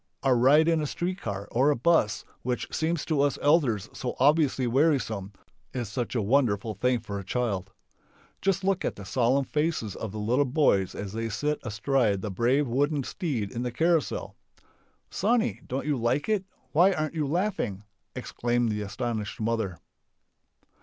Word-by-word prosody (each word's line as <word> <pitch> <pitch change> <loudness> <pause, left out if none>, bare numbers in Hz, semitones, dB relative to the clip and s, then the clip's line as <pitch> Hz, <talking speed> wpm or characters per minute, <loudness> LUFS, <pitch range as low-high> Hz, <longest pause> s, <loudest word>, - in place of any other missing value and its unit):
A 135 -2 +4
ride 140 +6 +5
in 165 -2 +3
a 150 - -1
street 180 +6 -3
car 100 -1 -4
or 130 +5 +3
a 150 - +3
bus 125 -5 +2 0.2
which 125 0 -2
seems 160 0 0
to 155 -4 +1
us 145 -1 +2
elders 140 - +2
so 125 - -4
obviously 140 -1 +3
wearisome 120 -7 +1 0.4
is 120 -5 -3
such 120 +2 -3
a 115 - +1
wonderful 110 -2 +2
thing 125 +2 +1
for 100 -1 -5
a - - -7
child. 100 -3 -2 0.7
Just 195 0 +1
look 190 -1 +1
at - - -1
the 100 - -9
solemn 130 +6 +2
faces 150 - -1
of 110 - -5
the 110 - -7
little 120 +7 +2
boys 125 - +2
as 100 -1 -5
they 115 0 -2
sit 150 +8 -1
astride 110 -3 +1
the 105 - -3
brave 125 +8 +2
wooden 140 +4 +1
steed 125 - -3
in 120 - -4
the 125 0 -2
carousal! 160 -2 0 0.8
"Sonny, 230 +4 +1
don't 135 +2 -3
you 150 -1 +1
like 125 +5 0
it? 210 -3 +1 0.3
Why 180 +5 +5
aren't 155 -3 -2
you 155 -3 -1
laughing?" 170 - -1 0.3
exclaims 120 -1 -1
the 105 0 -2
astonished 105 -1 -4
mother. 110 -5 -1
125 Hz, 170 wpm, -27 LUFS, 110-150 Hz, 0.8 s, ride